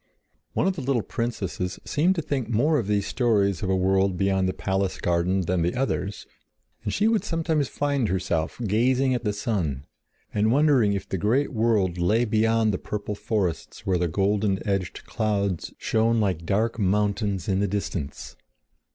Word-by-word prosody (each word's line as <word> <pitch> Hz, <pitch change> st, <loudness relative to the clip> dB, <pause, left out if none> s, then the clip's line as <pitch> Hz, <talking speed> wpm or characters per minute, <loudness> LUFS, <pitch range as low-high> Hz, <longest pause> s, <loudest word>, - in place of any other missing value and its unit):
One -, -, +1 dB
of 190 Hz, 0 st, +1 dB
the 155 Hz, -, -5 dB
little 130 Hz, -4 st, 0 dB
princesses 95 Hz, -5 st, -3 dB
seemed 170 Hz, +6 st, +2 dB
to 165 Hz, -, -2 dB
think 135 Hz, -6 st, -2 dB
more 145 Hz, +7 st, +2 dB
of 110 Hz, -, -3 dB
these 105 Hz, -1 st, +1 dB
stories 100 Hz, -7 st, +1 dB
of 95 Hz, -, -2 dB
a 95 Hz, -, +3 dB
world 95 Hz, 0 st, +2 dB
beyond 95 Hz, -1 st, +1 dB
the -, -, +1 dB
palace 95 Hz, 0 st, -1 dB
garden 90 Hz, +2 st, +1 dB
than 90 Hz, 0 st, 0 dB
the 85 Hz, +2 st, 0 dB
others, 115 Hz, -6 st, -2 dB, 0.6 s
and -, -, -2 dB
she 210 Hz, -, +2 dB
would 225 Hz, -2 st, +2 dB
sometimes 160 Hz, -4 st, 0 dB
find 140 Hz, -5 st, 0 dB
herself 85 Hz, -2 st, -1 dB
gazing 125 Hz, +5 st, +2 dB
at 120 Hz, -2 st, -2 dB
the 105 Hz, -, +1 dB
sun, 90 Hz, -, -2 dB, 0.5 s
and 105 Hz, +1 st, +2 dB
wondering 135 Hz, -7 st, +4 dB
if 100 Hz, -, -3 dB
the 95 Hz, -, -3 dB
great 130 Hz, +10 st, +1 dB
world 105 Hz, -6 st, +1 dB
lay 110 Hz, +7 st, +2 dB
beyond 110 Hz, 0 st, +2 dB
the 90 Hz, -, -2 dB
purple 105 Hz, 0 st, -4 dB
forests 100 Hz, -5 st, -3 dB
where 95 Hz, -2 st, +1 dB
the 90 Hz, -, +1 dB
golden 100 Hz, +3 st, 0 dB
edged 95 Hz, -3 st, -2 dB
clouds 100 Hz, -5 st, -1 dB
shone 115 Hz, +1 st, +1 dB
like 90 Hz, -6 st, -1 dB
dark 115 Hz, +4 st, 0 dB
mountains 100 Hz, -1 st, 0 dB
in 95 Hz, -1 st, +1 dB
the 100 Hz, -, +1 dB
distance. 90 Hz, -7 st, -4 dB
105 Hz, 175 wpm, -25 LUFS, 95-120 Hz, 0.6 s, wondering